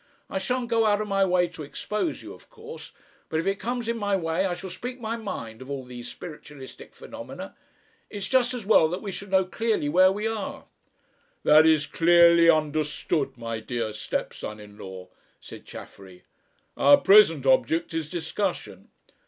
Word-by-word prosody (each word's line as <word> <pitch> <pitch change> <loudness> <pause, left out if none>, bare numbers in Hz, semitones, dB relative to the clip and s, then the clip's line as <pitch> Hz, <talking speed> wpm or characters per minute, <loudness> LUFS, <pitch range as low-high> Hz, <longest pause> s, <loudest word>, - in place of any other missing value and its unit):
I 190 - -1
shan't 245 +5 -2
go 225 -2 +2
out 205 -1 +2
of 215 - -3
my 195 -1 +2
way 180 -1 +2
to 170 -2 -11
expose 210 - -4
you, - - -9
of - - -18
course, 460 -1 -11 0.4
but 160 - -1
if 165 - -3
it 195 +1 -1
comes 240 0 -3
in 230 0 -1
my 205 -1 0
way 165 +1 0
I 175 - -2
shall 190 0 -8
speak 250 +7 -7
my 225 -1 -3
mind 115 - -7
of 130 - -10
all 140 -2 -4
these 125 -1 -9
spiritualistic 150 -4 -11
phenomena. - - -9 0.5
It's 200 -1 -5
just 255 -1 +2
as 235 -5 -6
well 195 -6 +5
that 180 +5 -5
we 200 - -4
should 200 +1 -8
know 190 0 +3
clearly 215 -5 -1
where 185 +4 +5
we 205 +2 -3
are." 225 -2 -4 0.8
"That 155 +1 +6
is 155 -2 +4
clearly 170 0 +5
understood, 155 -2 0
my 115 -1 -4
dear 115 -1 -4
stepson 105 0 -5
in 105 -1 -13
law," 95 -3 -10 0.3
said - - -12
Chaffery. 95 -2 -12 0.5
"Our 145 +1 +6
present 190 -9 +5
object 135 +6 +2
is 160 -2 -3
discussion." 175 +4 -4
170 Hz, 175 wpm, -25 LUFS, 145-210 Hz, 0.8 s, That